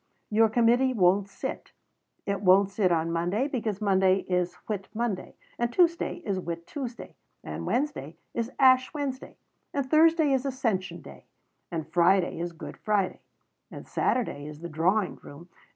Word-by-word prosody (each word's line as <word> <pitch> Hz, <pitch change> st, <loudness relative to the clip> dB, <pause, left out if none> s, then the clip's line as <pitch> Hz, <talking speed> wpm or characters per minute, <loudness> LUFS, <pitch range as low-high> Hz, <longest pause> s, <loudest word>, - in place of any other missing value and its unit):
Your 220 Hz, +1 st, +4 dB
Committee 240 Hz, +3 st, +3 dB
won't 195 Hz, 0 st, +3 dB
sit. -, -, -6 dB, 0.5 s
It 200 Hz, -1 st, -2 dB
won't 195 Hz, +1 st, +5 dB
sit 195 Hz, -3 st, +1 dB
on 165 Hz, 0 st, +1 dB
Monday 175 Hz, +10 st, 0 dB
because 220 Hz, -8 st, -3 dB
Monday 190 Hz, -2 st, +3 dB
is 180 Hz, -1 st, -1 dB
Whit 200 Hz, -3 st, -3 dB
Monday. 225 Hz, -5 st, -3 dB, 0.2 s
And 240 Hz, 0 st, 0 dB
Tuesday 345 Hz, +2 st, +1 dB
is 195 Hz, -2 st, -1 dB
Whit 170 Hz, -1 st, -5 dB
Tuesday. 255 Hz, -5 st, -7 dB, 0.3 s
And -, -, -6 dB
Wednesday 245 Hz, -, -2 dB, 0.2 s
is 230 Hz, 0 st, -2 dB
Ash 260 Hz, -1 st, +5 dB
Wednesday. 275 Hz, -3 st, -4 dB, 0.4 s
And 280 Hz, -2 st, -1 dB
Thursday 320 Hz, -1 st, +5 dB
is 260 Hz, -1 st, +1 dB
Ascension 190 Hz, -, -2 dB
Day. -, -, -13 dB, 0.4 s
And 160 Hz, -2 st, -4 dB
Friday 175 Hz, +2 st, +2 dB
is 175 Hz, 0 st, -3 dB
Good 165 Hz, -, -9 dB
Friday. 205 Hz, -3 st, 0 dB, 0.5 s
And -, -, -10 dB
Saturday 150 Hz, -, -1 dB
is 150 Hz, 0 st, -10 dB
the 170 Hz, -, -6 dB
Drawing 180 Hz, +6 st, +1 dB
Room. 165 Hz, +5 st, -13 dB
200 Hz, 150 wpm, -27 LUFS, 175-250 Hz, 0.5 s, won't